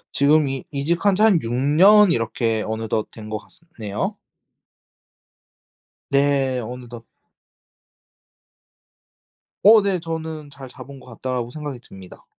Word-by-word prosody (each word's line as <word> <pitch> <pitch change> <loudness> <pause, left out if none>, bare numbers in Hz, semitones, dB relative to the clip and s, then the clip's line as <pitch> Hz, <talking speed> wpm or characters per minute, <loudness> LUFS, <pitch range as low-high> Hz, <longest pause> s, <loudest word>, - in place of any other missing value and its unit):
지금 150 +1 +3
이 135 -1 -4
이직한 170 +7 0
지 210 - +2
한 195 -7 +4
6 115 - -5
년 175 - +5
이렇게 115 -2 -1
어느덧 110 0 -3
된 110 -1 -11
것 110 - -4
같습 165 +9 -18
네요. 105 -1 -3 2.0
네. 140 -2 +1
어느덧. 120 0 -9 2.6
어. 215 +1 +8
네. 195 -3 -1
저는 160 -2 -6
'잘 135 -2 -11
잡은 135 +2 -12
것 125 - -17
같다.'라고 125 0 -4
생각이 145 -2 -7
듭니다. 95 -5 -15
135 Hz, 210 characters per minute, -21 LUFS, 115-160 Hz, 2.6 s, 어